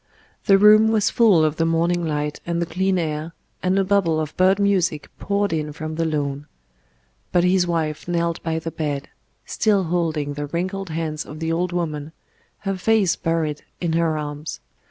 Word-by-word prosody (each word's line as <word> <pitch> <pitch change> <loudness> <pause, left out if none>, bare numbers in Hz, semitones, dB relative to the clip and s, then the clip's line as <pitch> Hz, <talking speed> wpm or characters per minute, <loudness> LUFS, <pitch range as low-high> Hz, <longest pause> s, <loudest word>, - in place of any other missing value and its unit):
The 195 -2 +6
room 210 +2 +7
was 220 -2 +2
full 205 -10 +5
of 155 +1 -1
the 165 - +2
morning 170 +1 +1
light 150 -2 -2
and 170 0 -2
the 170 - 0
clean 190 +2 0
air, 155 -1 -3 0.3
and 185 +1 +1
a 195 - +3
bubble 185 -5 +2
of 155 -1 -4
bird 185 +1 +4
music 185 -7 +1
poured 200 -2 0
in 155 -1 -2
from 155 +1 -5
the 165 +1 -1
lawn. 145 -2 -2 0.8
But 175 - +3
his 180 0 +3
wife 160 -3 -2
knelt 170 -1 -1
by 160 -1 -2
the 165 0 -4
bed, 145 -4 -3 0.4
still 205 -3 +1
holding 160 -4 -1
the 145 0 -4
wrinkled 185 +4 -3
hands 160 -1 -3
of 150 - -10
the 165 0 -2
old 175 +2 0
woman, 160 -3 -3 0.5
her 195 -1 -2
face 210 -2 +2
buried 160 -3 -1 0.2
in 170 -2 -1
her 165 -1 +1
arms. 150 +1 -5
165 Hz, 180 wpm, -22 LUFS, 155-185 Hz, 0.8 s, room